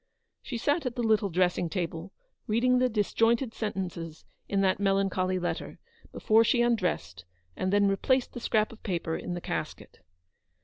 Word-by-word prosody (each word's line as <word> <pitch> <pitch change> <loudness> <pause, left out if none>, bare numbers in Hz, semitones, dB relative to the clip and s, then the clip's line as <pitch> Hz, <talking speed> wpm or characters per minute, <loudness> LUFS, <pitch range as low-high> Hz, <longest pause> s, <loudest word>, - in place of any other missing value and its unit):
She 240 - -5
sat 290 +4 0
at 245 - -4
the 240 - -2
little 220 -2 +2
dressing 180 -1 +1
table, 170 0 -4 0.4
reading 250 +3 +3
the 255 0 +3
disjointed 225 +3 +1
sentences 175 -7 -5 0.2
in 200 -1 +1
that 190 0 +2
melancholy 195 -2 +1
letter, 175 -1 -4 0.3
before 220 +1 +3
she 240 +1 +3
undressed, 175 - -1 0.3
and 185 - -1
then 205 0 +4
replaced 250 +6 +1
the 245 - -6
scrap 215 -2 +1
of 225 - -14
paper 170 -5 -2
in 180 - -4
the 175 - -5
casket. - - -5
200 Hz, 160 wpm, -28 LUFS, 180-230 Hz, 0.4 s, then